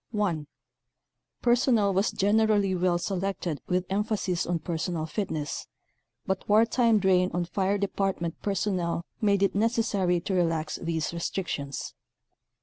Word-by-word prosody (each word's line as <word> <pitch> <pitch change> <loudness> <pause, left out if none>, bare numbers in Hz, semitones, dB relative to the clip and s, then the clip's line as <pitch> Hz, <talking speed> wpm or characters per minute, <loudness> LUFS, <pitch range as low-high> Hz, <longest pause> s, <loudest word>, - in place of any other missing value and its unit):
(1) 185 -9 -1 1.0
Personnel 240 -4 +3
was 195 +3 +2
generally 205 -1 +2
well 180 -1 +2
selected 185 -4 -2
with 180 0 0
emphasis 200 -3 -1
on 175 0 +1
personal 165 0 -3
fitness, 155 -4 -3 0.6
but 190 +1 -3
wartime 230 +2 +4
drain 185 -2 +3
on 175 0 0
fire 195 +3 0
department 195 -4 -1
personnel 180 -4 -1 0.2
made 200 -2 +3
it 195 - +2
nec 225 +4 +2
essary 195 -6 +1
to 195 - -1
relax 165 -3 0
these 165 -1 -2
restrictions. 165 -5 -3
190 Hz, 125 wpm, -27 LUFS, 170-205 Hz, 1.0 s, wartime